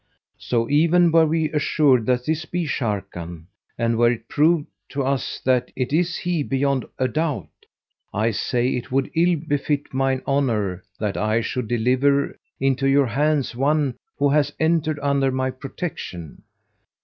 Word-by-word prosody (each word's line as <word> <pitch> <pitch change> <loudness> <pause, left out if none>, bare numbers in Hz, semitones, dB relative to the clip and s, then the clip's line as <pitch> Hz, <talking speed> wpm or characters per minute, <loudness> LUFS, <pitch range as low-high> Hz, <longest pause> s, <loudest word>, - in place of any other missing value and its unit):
So 115 -2 0
even 170 +4 +4
were 165 -1 +5
we 160 0 0
assured 140 -5 +2
that 125 -1 +1
this 160 0 -1
be 175 +1 -2
Sharrkan 95 - -4 0.3
and 115 0 0
were 120 0 +5
it 115 -1 -6
proved 155 +1 +2 0.2
to 140 -1 -2
us 135 0 -2
that 125 -1 +2
it 130 +1 -2
is 170 +2 +1
he 175 -3 -1
beyond 135 -1 0
a 130 - +1
doubt, 155 +2 -2 0.6
I 110 +3 +1
say 120 +4 0
it 125 -1 -3
would 135 +1 0
ill 170 +2 +3
befit 145 0 -1
mine 135 0 0
honour 110 -10 0 0.2
that 105 -2 -2
I 110 +2 +1
should 125 0 -3
deliver 130 +5 +2 0.2
into 135 0 +1
your 140 0 +4
hands 140 +2 0
one 140 +1 +1 0.2
who 145 0 +2
hath 145 0 +2
entered 160 -1 +1
under 140 -1 +2
my 130 0 -1
protection. 130 - -7
135 Hz, 155 wpm, -22 LUFS, 120-150 Hz, 0.6 s, were